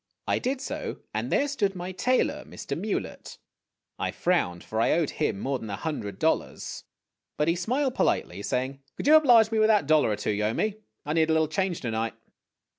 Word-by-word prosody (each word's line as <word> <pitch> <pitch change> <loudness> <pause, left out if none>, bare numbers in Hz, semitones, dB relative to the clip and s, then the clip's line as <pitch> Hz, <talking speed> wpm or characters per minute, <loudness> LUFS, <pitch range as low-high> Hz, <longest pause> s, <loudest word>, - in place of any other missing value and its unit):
I - - +1
did 260 +1 -2
so, - - -5
and - - -2
there 285 - +2
stood 210 -9 0
my 180 +1 -5
tailor, 250 +7 +1
Mr. - - -6
Mewlett. - - -4 0.6
I - - -1
frowned, 90 - 0
for 110 +1 -2
I - - +3
owed 160 -3 +1
him 95 - -1
more 135 +2 -1
than 110 - -7
a 100 - -2
hundred 105 -9 -4
dollars. - - -1 0.5
But 150 - +1
he 165 - +3
smiled 255 +9 0
politely, 100 - 0
saying, 130 +5 -2
" - - -54
Could - - -5
you 300 - +6
oblige 240 -8 +7
me 220 - +1
with 215 - +5
that 210 -8 +4
dollar 155 -4 +4
or 105 - +1
two 105 - -2
you 105 0 -1
owe 110 - 0
me? 215 -1 -1 0.3
I 150 - -1
need 160 0 +3
a - - +4
little 160 0 +3
change 185 +2 -1
to 120 - -2
night." 110 0 -2
165 Hz, 215 wpm, -27 LUFS, -, 0.6 s, oblige